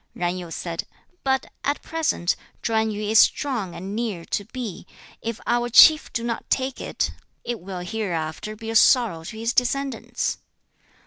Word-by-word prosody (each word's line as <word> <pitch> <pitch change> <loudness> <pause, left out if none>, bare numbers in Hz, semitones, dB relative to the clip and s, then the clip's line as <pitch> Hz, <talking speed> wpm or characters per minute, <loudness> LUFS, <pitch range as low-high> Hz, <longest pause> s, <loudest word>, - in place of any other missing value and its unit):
Zan 175 0 0
Yu 180 -2 -6
said, 165 0 -4 0.4
'But 265 -1 +1 0.2
at 285 +1 -1
present, 315 - 0 0.3
Chwan 220 -1 +1
yu 210 0 -4
is 215 +1 +4
strong 240 -11 +2
and 195 +4 -5
near 215 -7 -3
to 205 - -2
Pi; 220 -5 -6 0.4
if 230 -1 -4
our 240 0 +1
chief 305 +6 +8
do 230 - -2
not 235 -1 -2
now - - -34
take 260 0 0
it, - - -1 0.3
it 240 -1 -3
will 180 0 -6
hereafter 180 -1 -3
be 225 +1 -6
a - - -4
sorrow 220 -8 +5
to 220 - -8
his 230 +2 -1
descendants.' 265 0 0
220 Hz, 170 wpm, -24 LUFS, 185-245 Hz, 0.4 s, chief